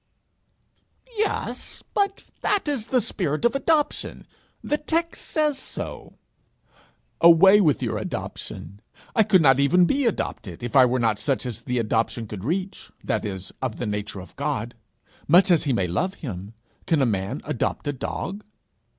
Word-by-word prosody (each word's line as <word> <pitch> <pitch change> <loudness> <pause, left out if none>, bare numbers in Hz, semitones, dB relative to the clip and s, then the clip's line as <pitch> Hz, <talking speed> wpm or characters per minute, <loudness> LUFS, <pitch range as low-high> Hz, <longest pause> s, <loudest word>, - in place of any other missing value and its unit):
'Yes; 430 - -2
but 400 -1 0 0.2
that 410 -6 +1
is 270 -7 -2
the 255 -2 +2
spirit 170 -3 -1
of 235 - +4
adoption; 295 +2 0 0.4
the 295 - 0
text 330 +2 -1
says 300 -3 +1
so.' - - -5 1.0
'Away 190 +5 +8
with 150 - +2
your - - -1
adoption! 100 +1 -7 0.3
I 225 - +5
could 195 -5 +4
not 135 -2 +5
even 160 +6 +5
be 275 +6 +1
adopted 100 - -3
if 120 +3 -4
I 130 -2 +8
were 125 +1 0
not 110 -3 +1
such 135 0 -1
as 120 -4 -5
the 125 -1 -2
adoption 115 0 0
could 105 -3 -7
reach 185 - -3
that - - -1
is, 95 -2 -5
of 125 -5 -2
the - - -3
nature 105 -1 -4
of 90 - -14
God. - - -2 0.5
Much 180 +5 +6
as 165 -3 +4
he 140 - +1
may 95 -6 +1
love 180 - -1
him, 100 - -7 0.3
can 160 -6 +3
a - - +4
man 105 +3 -2
adopt 130 - -2
a 145 - 0
dog? 195 +9 -5
150 Hz, 160 wpm, -24 LUFS, -, 1.0 s, Away